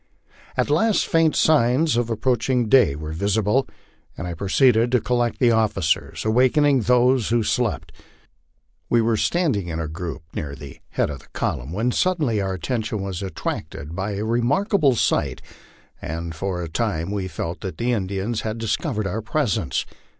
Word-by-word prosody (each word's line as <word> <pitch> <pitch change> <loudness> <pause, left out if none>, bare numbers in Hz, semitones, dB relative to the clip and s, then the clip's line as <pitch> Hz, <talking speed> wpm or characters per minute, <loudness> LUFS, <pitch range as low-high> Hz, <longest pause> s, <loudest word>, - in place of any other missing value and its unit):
At - - +1
last 205 +8 +3
faint 165 -2 +2
signs 150 0 +3
of 120 -1 0
approaching 120 +1 +1
day 120 - +5
were 75 +1 -6
visible, 105 +8 +1 0.5
and 80 - -5
I 90 - -4
proceeded 115 - +3
to 125 - +4
col 125 +3 -1
lect 120 -1 0
the 120 -3 +4
officers, 105 -8 0
awakening 130 +5 +4
those 125 +1 +3
who 115 0 +2
slept. 120 +1 -1 1.0
We 120 - +4
were 115 0 +2
standing 135 - 0
in 80 -1 -4
a 80 - -2
group 80 -1 -6
near 70 -2 -4
the 70 -3 -11
head - - 0
of 70 - -7
the - - -20
column, 60 +5 -2
when 110 +7 0
suddenly 150 - +1
our 95 -1 -2
attention 110 0 -3
was 95 -2 -4
attracted 80 -4 -5
by 100 +2 -2
a 105 +2 -3
remarkable 140 - +2
sight, - - 0 0.6
and 85 +1 -5
for 90 +1 -3
a - - -4
time 90 -1 -2
we 100 -2 -2
felt 85 0 -5
that 95 - -5
the 120 +1 0
Indians 100 +1 -2
had 110 0 -3
discovered 115 - -2
our 100 +4 -2
presence. 110 - -1
110 Hz, 165 wpm, -22 LUFS, 95-125 Hz, 1.0 s, day